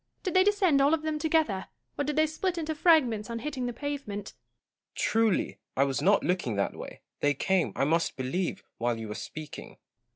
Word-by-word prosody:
Did 370 Hz, -, -2 dB
they 370 Hz, -, +6 dB
descend 385 Hz, -8 st, +3 dB
all 285 Hz, +4 st, +5 dB
of 310 Hz, -, -8 dB
them 310 Hz, -1 st, -1 dB
together; 310 Hz, -, +1 dB, 0.3 s
or -, -, -1 dB
did 295 Hz, +1 st, -2 dB
they 310 Hz, +1 st, +4 dB
split 345 Hz, +4 st, -2 dB
into 320 Hz, -1 st, -2 dB
fragments 265 Hz, -10 st, +3 dB
on 230 Hz, -, -3 dB
hitting 255 Hz, 0 st, -3 dB
the -, -, -2 dB
pavement? 240 Hz, -6 st, -5 dB
Gaunt. -, -, -48 dB
Truly, 225 Hz, -3 st, +1 dB, 0.2 s
I 135 Hz, -, +5 dB
was 135 Hz, -1 st, -1 dB
not 200 Hz, +2 st, +4 dB
looking 175 Hz, -, 0 dB
that 100 Hz, -, -1 dB
way: -, -, -9 dB, 0.2 s
they 145 Hz, 0 st, +2 dB
came, 190 Hz, +4 st, +1 dB
I -, -, +1 dB
must 165 Hz, +3 st, +1 dB
believe, 135 Hz, +8 st, -2 dB, 0.2 s
while 120 Hz, 0 st, 0 dB
you 110 Hz, -1 st, -6 dB
were -, -, -3 dB
speaking. 155 Hz, +6 st, -8 dB
235 Hz, 200 wpm, -28 LUFS, -, 0.3 s, they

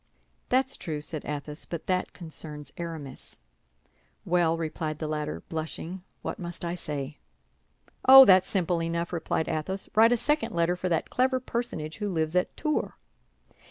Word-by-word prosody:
"That's 265 Hz, +1 st, +1 dB
true," 155 Hz, -4 st, -4 dB
said 150 Hz, 0 st, -5 dB
Athos; 150 Hz, +1 st, -4 dB
"but 170 Hz, -2 st, -6 dB
that 185 Hz, -1 st, 0 dB
concerns 155 Hz, -3 st, -5 dB
Aramis." 160 Hz, -6 st, -7 dB, 0.9 s
"Well," 170 Hz, -2 st, +2 dB
replied 155 Hz, -1 st, -3 dB
the 155 Hz, -, -3 dB
latter, 150 Hz, -, -3 dB
blushing, 160 Hz, +3 st, -5 dB, 0.2 s
"what -, -, -4 dB
must 175 Hz, -1 st, -5 dB
I 170 Hz, -, -2 dB
say?" 150 Hz, -4 st, -5 dB, 0.9 s
"Oh, 270 Hz, 0 st, +12 dB
that's 185 Hz, -3 st, +6 dB
simple 175 Hz, -3 st, +1 dB
enough!" 170 Hz, +1 st, -2 dB
replied 160 Hz, -1 st, -1 dB
Athos. 170 Hz, +5 st, -2 dB
"Write 225 Hz, +2 st, +6 dB
a 245 Hz, -, +4 dB
second 295 Hz, -, 0 dB
letter 170 Hz, +1 st, +2 dB
for 180 Hz, 0 st, -2 dB
that 165 Hz, -2 st, 0 dB
clever 255 Hz, +1 st, +2 dB
personage 235 Hz, -11 st, -4 dB
who 210 Hz, -1 st, -2 dB
lives 160 Hz, -2 st, -1 dB
at 180 Hz, -, +1 dB
Tours." 305 Hz, -1 st, -1 dB
170 Hz, 155 wpm, -28 LUFS, 155-190 Hz, 0.9 s, Oh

